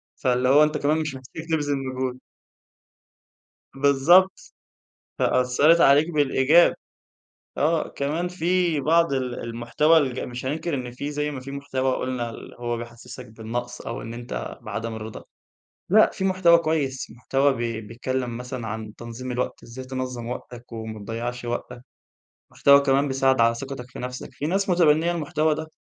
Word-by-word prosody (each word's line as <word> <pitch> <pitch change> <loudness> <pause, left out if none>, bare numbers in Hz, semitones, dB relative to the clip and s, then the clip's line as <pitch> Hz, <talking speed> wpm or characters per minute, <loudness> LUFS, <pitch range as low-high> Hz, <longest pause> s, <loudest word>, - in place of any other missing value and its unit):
فاللي 125 -1 +1
هو 145 +3 +7
أنت 150 0 +1
كمان 150 +2 +1
مش 155 -3 -4
محتاج 130 +4 -9
تبذِل 145 -3 +1
مجهود. 130 -1 -3 1.6
بالضبط، 145 +7 +3 0.7
فأثّرت 135 +7 +4
عليك 145 +4 +5
بالإيجاب. 145 +2 +4 0.8
آه 160 +3 +1
كمان 155 +6 -2
في 175 -2 +1
بعض 165 +2 +3
ال 130 -2 -1
المحتوى 120 +8 +2
الج 130 -4 -1
مش 125 +1 -6
هننكر 160 +4 -2
إن 125 -3 -4
في 140 +4 -5
زي 150 0 -2
ما 135 -3 -6
في 135 +2 -9
محتوى 135 -2 -1
قُلنا 125 -2 -3
اللي - - -11
هو 120 -1 -2
بيحسسك 120 +1 -9
بالنقص 115 +3 -6
أو 115 - -5
إن 115 +1 -7
أنت 120 0 -6
بعدم 115 +1 -4
الرضا. 110 0 -8 0.7
لأ 215 +4 +6
في 190 - -4
محتوى 185 -3 +5
كويس 155 -5 -1
محتوى 135 +4 +1
بي 115 -2 -3
بيتكلم 120 +2 -4
مثلًا 125 -1 -6
عن 110 0 -6
تنظيم 120 +2 -7
الوقت 125 +1 -3
إزاي 130 +3 -9
تنظم 130 -2 -4
وقتك 125 0 -8
وما 110 -1 -6
تضيّعش 120 +4 -5
وقتك. 120 +1 -4 0.7
محتوى 140 0 +6
كمان 140 +1 +2
بيساعد 130 -2 +2
على 115 0 +4
ثقتك 135 0 -6
في - - -9
نفسك. 125 0 -6
في 145 - -5
ناس 195 +4 0
متبنية 170 -1 +4
المحتوى 160 -2 0
ده. 155 +1 -5
130 Hz, 155 wpm, -24 LUFS, 120-150 Hz, 1.6 s, هو